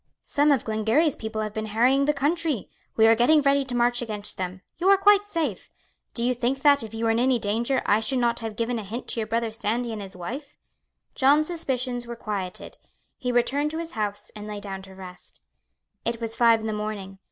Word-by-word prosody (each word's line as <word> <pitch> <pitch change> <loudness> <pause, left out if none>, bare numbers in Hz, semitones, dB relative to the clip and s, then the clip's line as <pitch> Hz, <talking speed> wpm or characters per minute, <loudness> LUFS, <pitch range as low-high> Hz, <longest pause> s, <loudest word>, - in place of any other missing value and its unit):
"Some 290 +1 +2
of 270 -5 +2
Glengarry's 225 +8 +2
people 220 -1 -4
have 215 -1 -4
been 220 0 -3
harrying 250 +6 +3
the 295 - +3
country. 295 - -1 0.3
We 220 - +5
are 225 - +7
getting 245 +7 +5
ready 280 0 +3
to 250 -2 -3
march 240 0 +2
against 210 -3 -4
them. 185 0 -4 0.2
You 365 +2 +3
are 395 - +7
quite 410 +1 +5
safe. 315 - -3 0.5
Do 235 - 0
you 250 +1 +2
think 250 +2 -1
that, 285 -2 +6
if 220 - -4
you 225 +1 -2
were 225 - +3
in 225 - +1
any 255 0 +3
danger, 235 +5 0
I 205 - +4
should 225 +4 0
not 235 -1 +1
have 225 -2 -5
given 230 +1 -1
a - - -6
hint 225 +5 -6
to - - -1
your 220 - -2
brother 230 0 -1
Sandy 230 +2 -2
and 215 - -5
his 195 -1 -9
wife?" 265 - -7 0.6
John's 290 +3 +4
suspicions 255 -7 -2
were 235 - -5
quieted. 200 -5 -5 0.4
He 250 -3 -1
returned 270 +5 +1
to 320 - -5
his 330 0 -5
house, 205 -2 -2
and 210 0 -8
lay 210 -1 -5
down 195 -1 -6
to 190 0 -13
rest. 185 -1 -11 0.6
It 235 0 -2
was 225 -1 -4
five 230 -2 +4
in - - -6
the 220 - -1
morning. 210 -2 -5
235 Hz, 225 wpm, -25 LUFS, 215-270 Hz, 0.6 s, are